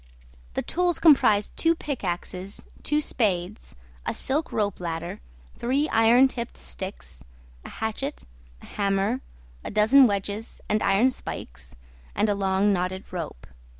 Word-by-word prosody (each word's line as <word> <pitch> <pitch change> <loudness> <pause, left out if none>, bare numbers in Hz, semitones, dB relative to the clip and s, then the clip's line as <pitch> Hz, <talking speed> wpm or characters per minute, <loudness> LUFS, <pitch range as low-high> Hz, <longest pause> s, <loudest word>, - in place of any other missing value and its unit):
The - - -1
tools 355 0 +1
comprised 215 -10 +4
two 330 0 +3
pickaxes, 190 - -4 0.2
two 300 +1 +1
spades, 205 -7 -2 0.3
a - - -2
silk 295 +4 -1
ropeladder, 175 -5 -2 0.4
three 270 +5 +1
iron 230 +4 +6
tipped 235 -2 -6
sticks, 60 -1 -7 0.4
a - - -9
hatchet, 220 +6 -4 0.4
a - - -10
hammer, 200 +4 0 0.4
a - - -5
dozen 225 +6 +6
wedges 205 +1 -3
and 215 0 +1
iron 205 +7 +4
spikes, 60 - -7 0.4
and 215 - +2
a - - +3
long 195 +1 +2
knotted 185 +1 -3
rope. 165 - -5
210 Hz, 125 wpm, -26 LUFS, 185-255 Hz, 0.4 s, iron